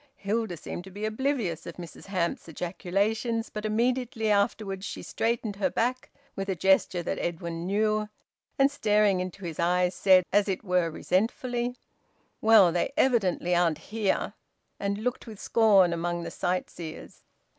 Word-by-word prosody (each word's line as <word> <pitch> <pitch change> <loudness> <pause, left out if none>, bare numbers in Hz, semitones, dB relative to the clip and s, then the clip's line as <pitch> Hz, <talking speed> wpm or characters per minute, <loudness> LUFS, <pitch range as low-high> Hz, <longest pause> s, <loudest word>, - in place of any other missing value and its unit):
Hilda 210 - -2
seemed 175 - -6
to - - -10
be 205 +3 -5
oblivious 220 - -1
of 170 - -7
Mrs 170 -3 -10
Hamps's 180 -4 -2
ejaculations, 200 - -1
but 210 0 -5
immediately 230 0 0
afterwards 200 -1 0
she - - -6
straightened 225 -3 -2
her 200 - +1
back, 250 +2 -1 0.3
with 195 0 -4
a 190 - 0
gesture 185 0 +2
that - - -3
Edwin 170 0 -4
knew, 215 +1 +1 0.5
and 275 +1 +4
staring 210 -7 +2
into 185 +1 -5
his 165 -3 -6
eyes 180 +1 +2
said, 185 -2 +5
as 205 0 +4
it 190 +1 -2
were 180 -3 +1
resentfully 240 +8 -1 0.6
"Well, 220 -5 +7
they 175 0 0
evidently 200 - +2
aren't 170 -3 +2 0.2
here!" 215 -3 0 0.5
And 200 0 -1
looked 245 +3 -3
with 215 -3 -9
scorn 200 -6 +4
among 175 0 -2
the - - -6
sightseers. 175 -2 -4
200 Hz, 150 wpm, -27 LUFS, 180-225 Hz, 0.6 s, Well